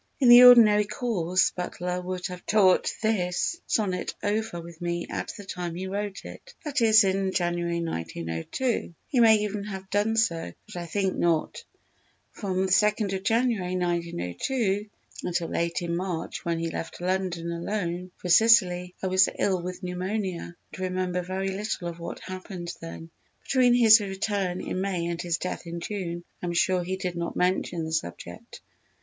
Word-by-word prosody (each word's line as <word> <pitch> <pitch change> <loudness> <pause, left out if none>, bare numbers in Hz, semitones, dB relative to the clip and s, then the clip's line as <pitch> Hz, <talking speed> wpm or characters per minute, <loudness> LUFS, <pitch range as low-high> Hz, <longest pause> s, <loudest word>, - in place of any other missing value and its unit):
In 255 -4 +5
the 240 +1 +11
ordinary 215 -4 +8
course 190 -5 0
Butler 180 0 -4
would 180 0 -5
have 180 -1 -6
talked 200 0 +3
this 215 - 0
Sonnet 190 -5 -1
over 210 -3 -1
with 170 0 -11
me 175 0 -2
at - - -4
the 205 - -9
time 175 -3 -5
he 185 +2 -4
wrote 200 +1 -4
it, - - -11
that 290 -3 -1
is 220 -1 +7
in 190 0 0
January, 175 -1 -1
1902; 85 - -3
he 260 - 0
may 225 -2 +7
even 210 -1 -3
have 190 -1 -7
done 210 +2 +1
so, 165 - 0
but - - -12
I 175 -1 -5
think 190 +2 -1
not. 165 -2 0 0.7
From 190 -2 -2
2_nd_ 200 0 +2
January, 225 -6 +1
1902, 180 - -1 0.3
until 175 -1 -2
late 170 +1 -1
in 170 0 -2
March, 180 -2 -4
when 170 -1 -1
he 165 0 -2
left 165 - -6
London 180 -2 -2
alone 175 0 -3
for - - -7
Sicily, 180 -3 +4
I - - 0
was 185 0 +4
ill 185 -3 +1
with 180 +2 -6
pneumonia 180 -1 -3 0.2
and - - -9
remember 185 -1 -1
very 190 +2 -3
little 195 -2 -3
of 170 0 -9
what 170 - -7
happened 185 -2 -7
then. 165 0 -9 0.3
Between 250 -2 +3
his 230 -2 +8
return 195 -2 -2
in 185 - -3
May 185 -3 -1
and 170 0 -3
his 175 -1 -1
death 180 -1 -5
in 170 0 -5
June 175 -2 -4 0.2
I 180 - -3
am 175 - -2
sure 180 +1 +2
he 185 +2 -3
did 180 -2 -3
not 170 0 -3
mention 180 -2 0
the 160 - -5
subject. 85 - -5
185 Hz, 165 wpm, -26 LUFS, 175-205 Hz, 0.7 s, the